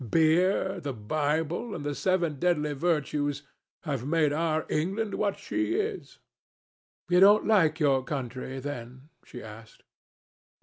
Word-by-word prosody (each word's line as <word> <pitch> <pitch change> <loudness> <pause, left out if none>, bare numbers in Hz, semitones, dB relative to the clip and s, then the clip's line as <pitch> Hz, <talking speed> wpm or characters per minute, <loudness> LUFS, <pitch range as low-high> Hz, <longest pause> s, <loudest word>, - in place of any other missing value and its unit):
Beer, 180 - +2
the 145 -5 -4
Bible, 155 - -2
and 145 - -6
the 145 - -1
seven 170 -3 0
deadly 150 -4 +1
virtues 145 -2 -1 0.4
have 140 -6 -3
made 150 0 +1
our 155 0 0
England 195 +7 -1
what 200 -2 -1
she 320 +2 -2
is." 425 -1 -3 0.9
"You 180 0 +4
don't 205 +3 +6
like 170 -7 +3
your 135 -4 +3
country, 130 -1 -5
then?" 130 0 -7
she 125 - -10
asked. 110 +1 -12
155 Hz, 130 wpm, -28 LUFS, 140-180 Hz, 0.9 s, don't